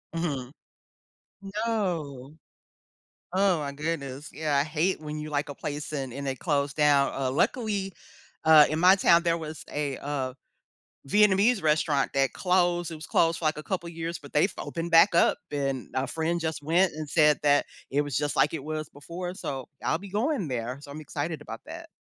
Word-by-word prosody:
Mhm. 140 -7 -2 1.2
No. 155 - -3 1.0
Oh 190 -3 +3
my 140 -1 -4
goodness, 145 -2 -4
yeah, 150 -1 -1
I 140 - +3
hate 160 +3 0
when 150 0 -6
you 150 0 -6
like 145 0 -1
a 145 - -6
place 150 +1 -5
and 135 -4 -3
and 140 +1 -5
it 130 - -3
close 140 -4 0
down. 145 -2 +3
Uh, 130 -1 -1
luckily, 200 - 0 0.5
uh, 155 -2 +8
in 155 - -1
my 185 +2 +7
town 170 -3 +5
there 170 -1 +1
was 155 -1 -7
a, 145 -2 -2
uh, 135 -3 -3 0.7
Vietnamese 205 - +4
restaurant 150 -2 +2
that 135 -2 +2
closed. 175 -2 +1
It - - -5
was 155 - -8
closed 165 0 +2
for, - - -6
like, 155 - +1
a - - -6
couple 175 -3 -3
of - - -9
years, 165 +1 -4
but 145 - -13
they've 150 +7 +3
opened 170 0 -5
back 170 +2 +7
up - - +4
and 135 -3 -2
a 130 +1 0
friend 165 +2 -1
just 160 -2 -3
went 175 +5 +3
and 155 -1 -6
said 150 -2 +4
that 145 -1 +3 0.2
it 140 +2 +2
was 145 -3 -4
just 145 0 0
like 150 - +3
it 145 - -4
was 155 -1 -4
before, 175 +5 -7
so 135 -7 -5 0.2
I'll 160 - +1
be 200 +1 -10
going 220 - 0
there, 125 +1 -3
so 145 -1 -12
I'm 155 - -7
excited 155 +1 -4
about - - -8
that. 330 +2 -9
155 Hz, 195 wpm, -27 LUFS, 145-175 Hz, 1.2 s, uh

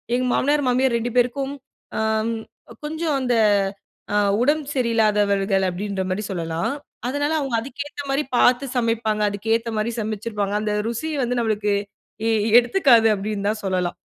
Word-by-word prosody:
எங்க 255 +1 0
மாமனார், 290 +1 +2
மாமியார் 255 0 +2
2 240 +1 -3
பேருக்கும், 270 +3 +1 0.4
அ - - 0 0.9
கொஞ்சம் 315 0 -1
அந்த 250 -1 0 0.8
அ 210 - +3 0.2
உடம்பு 295 +2 +1
சரியில்லாதவர்கள 210 -5 +2
அப்பிடின்றமாரி 190 +1 -3
சொல்லலாம். 165 +5 -2 0.3
அதனால 290 +4 -1
அவுங்க 270 -5 -2
அதுக்கேத்தமாரி 280 +2 -4
பார்த்து 250 +2 +4
சமைப்பாங்க, 225 -2 0
அதுக்கேத்தமாரி 225 +2 -1
சமைச்சிருப்பாங்க. 210 -1 -3
அந்த 215 - -1 0.2
ருசி 235 +8 -3
வந்து 245 0 -1
நம்மளுக்கு 215 -2 0 0.6
எ - - +2 0.3
எடுத்துக்காது 240 -3 +5
அப்பிடின்னு 205 0 -3
தான் 220 - -1
சொல்லலாம். 185 -2 -1
230 Hz, 125 wpm, -22 LUFS, 205-265 Hz, 0.9 s, எடுத்துக்காது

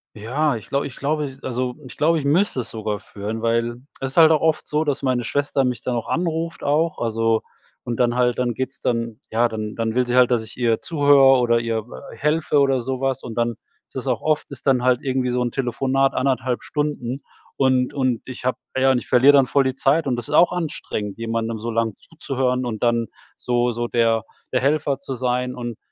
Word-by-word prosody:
Ja, 125 +5 0
ich 110 - -12
glaub 140 0 0
ich 135 - -7
glaube 145 -2 -2
also, 125 0 -3
ich - - -10
glaube, 165 +2 +2
ich 145 - -3
müsste 155 -2 +2
es 110 - -7
sogar 105 -2 -3
führen, 105 +2 -6
weil 115 +1 0 0.2
es 135 +2 -4
halt 160 -1 +8
auch 155 - +3
oft 160 -1 +1
so, 150 +1 0
dass 145 -2 -2
meine 125 -2 +1
Schwester 140 +2 0
mich 125 -3 -1
dann 125 - -1
auch 115 - -4
anruft 165 -1 -2
auch 155 +3 +1
also, 115 -1 +1 0.4
und 120 -1 -3
dann 120 -1 +2
halt 125 -1 +2
dann 125 -1 0
geht's 130 +3 -5
dann 115 0 -2
ja, 115 +2 +2
dann 110 -1 -5
dann 115 0 -1
will 125 - +2
sie 125 +1 0
halt, 125 -1 +6
dass 120 -3 +1
ich 110 - -10
ihr 115 -3 +1
zuhöre 140 -4 +5
oder 120 -1 +2
ihr 115 -2 -2 0.3
helfe 150 -1 +1
oder 135 -2 +3
so 130 +1 -3
was 135 0 -1
und 115 -2 -7
dann 120 0 +1 0.4
ist - - -27
das - - -4
auch - - 0
oft 155 -2 0
ist 140 +1 -9
dann 125 -2 +3
halt 125 0 +3
irgendwie 130 -3 -1
so'n 125 0 0
Telefonat 135 +2 0
1,5 130 -2 0
Stunden 145 -3 -3 0.3
und 130 -2 +2
und 130 -4 0
ich 130 -1 -8
hab 130 0 0 0.2
ja, 135 0 +4
und 130 - +2
ich - - -5
verlier 130 +3 +6
dann 140 -2 +5
voll 140 +2 +2
die 130 -1 -1
Zeit 140 +3 +2
und 125 - 0
das 120 - -4
ist - - -1
auch 175 - +6
anstrengend, 150 - -4
jemandem 115 0 -2
so 115 +2 -4
lang 115 -2 0
zuzuhören 130 -5 -2
und 115 -1 -4
dann 115 -1 +2 0.3
so 120 0 0
so 120 +1 -3
der 115 -2 +2 0.3
der 130 - +2
Helfer 140 +1 +1
zu 160 -8 -5
sein 125 0 -1
und 120 -3 -5
125 Hz, 220 wpm, -22 LUFS, 120-140 Hz, 0.4 s, halt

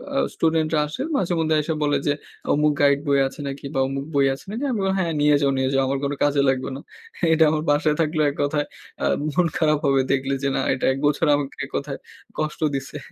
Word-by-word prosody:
আ - - +1 0.2
স্টুডেন্টরা 160 -1 +1
আসে, 155 - -6 0.2
মাঝে-মধ্যে 165 -4 +1
আইসা 160 +2 -1
বলে 145 -1 +2
যে, 145 - +3 0.4
"অমুক 150 +1 +3
গাইড 140 0 +4
বই 140 -1 +3
আছে 145 - -11
নাকি 140 0 -6
বা 135 - +1
অমুক 135 +1 -4
বই 140 - +4
আছে - - -15
নাকি?" 235 +6 -4
আমি 230 - -1
বলি, 190 0 +1
"হ্যাঁ, 170 -3 0
নিয়ে 150 0 +5
যাও, 140 -1 +3
নিয়ে 130 0 +1
যাও 135 - +3
আমার 135 0 -1
কোনো 140 0 -1
কাজে 145 -1 +3
লাগবে 130 0 -1
না।" 135 - -6 0.5
এটা 160 0 +5
আমার 155 0 -1
বাসায় 150 +1 +2
থাকলে 155 0 0
এক - - -13
কথায় 145 0 0 0.4
আ - - +2 0.3
মন 180 +3 +3
খারাপ 155 -2 +3
হবে 135 -1 +3
দেখলে 135 0 0
যে 140 - +2
না, - - +1
এটা 130 - -2
১ 135 - -5
বছর 150 +3 +1
আমাকে 140 -1 -4
এক - - -15
কথায় 140 -1 -4 0.4
কষ্ট 155 -1 -2 0.2
দিছে। 135 +2 -5
145 Hz, 230 wpm, -23 LUFS, 140-155 Hz, 0.5 s, নিয়ে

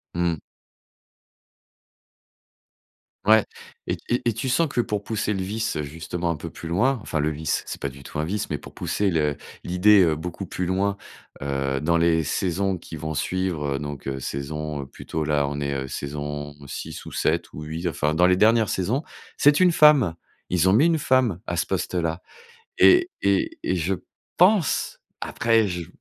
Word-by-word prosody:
Mmh. 85 -1 +1 2.9
Ouais, 110 0 +6 0.4
et - - 0
et 120 - +1
et 120 - +2
tu 130 +5 -3
sens 155 +6 +3
que 125 - 0
pour 105 -3 -2
pousser 110 0 -2
le 95 - -2
vice, 110 +3 -2
heu, 75 - -1
justement 80 +4 -4
un 85 - 0
peu 75 - -7
plus 85 - -9
loin, 120 +10 +2
enfin 75 -8 -2
le 75 - +1
vice, 80 0 -2
c'est - - -7
pas - - -1
du 70 0 -10
tout 75 - -6
un 75 - 0
vice, 100 +5 -2
pour 75 -3 -6
pousser 100 -1 -1
le 75 -3 +1 0.3
l'idée, 95 +3 +5
heu, 80 -2 +2
beaucoup 90 +4 -5
plus 90 +1 -3
loin, 100 +2 0 0.4
heu, 70 -1 -1
dans 85 +4 +1
les 85 -1 +3
saisons 95 +4 0
qui 85 -1 -9
vont 80 +1 -4
suivre, 80 -3 -1
heu, - - -2
donc 75 -1 -6
heu, 65 - -3
saison, 75 +2 -4
heu, - - -7
plutôt 80 +3 -5
là, 75 -1 +1
on 70 +1 -4
est 70 -1 -2
saison 75 +1 -5
6 - - -7
ou - - -9
7 - - 0
ou 75 - -7
8, 80 +3 -4
enfin 75 -2 0
dans 90 +3 +4
les 90 - +4
dernières 110 +3 +4
saisons, 115 - 0 0.3
c'est 145 +4 +5
une 180 -1 +6
femme. 150 - +5 0.3
Ils 90 0 +2
ont 95 - +5
mis 135 +9 +5
une 165 -2 +2
femme 130 - +2
à 85 - -2
ce 85 - 0
poste-là 85 -1 -2 0.6
et 360 -1 +6
et 100 -1 +1
et - - 0
je 90 +2 0 0.4
pense 180 - +3 0.2
après 115 -2 +2
je 90 -3 -4
85 Hz, 185 wpm, -24 LUFS, 75-105 Hz, 2.9 s, Ouais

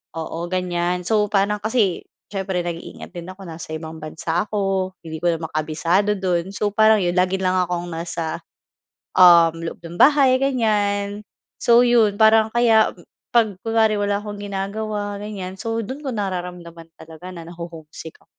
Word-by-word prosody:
oo 160 0 -5
ganyan. 180 -1 -1
So 210 -2 +2
parang 205 +1 +1
kasi 215 -5 +1 0.3
siyempre 190 -2 -2
nag-iingat 170 -1 -7
din 175 -2 -8
ako, 190 +1 -14
nasa 160 -1 -8
ibang 160 0 -7
bansa 160 +4 -2
ako, 195 -2 -1
hindi 160 -1 -6
ko 175 - +1
naman 160 -1 -6
kabisado 165 +6 +1
do'n. 185 0 -1
So, 205 +1 0
parang 215 -1 +5
yun 175 0 0
lagi 185 +1 +2
lang 185 0 +1
akong 175 -1 -1
nasa, 165 -1 -4 0.8
um, 170 -2 +7
loob 165 - -6
ng 170 +1 -9
bahay 270 -3 +5
ganyan. 210 -5 0 0.4
So, 235 +1 +5
'yon 225 -4 +4
parang 220 0 +6
kaya 225 -2 +4 0.4
'pag 215 -5 +3
kunwari 220 -2 +3
wala 205 0 0
akong 205 -1 -7
ginagawa 205 +1 -4
ganyan, 195 -3 -6
so, 225 0 -3
do'n 260 +7 -6
ko 265 - -2
nararamdaman 180 -4 -5
talaga 160 +3 -10
na 165 - -8
naho-home 170 -2 -9
sick 160 - -10
ako. - - -26
190 Hz, 160 wpm, -21 LUFS, 170-210 Hz, 0.8 s, um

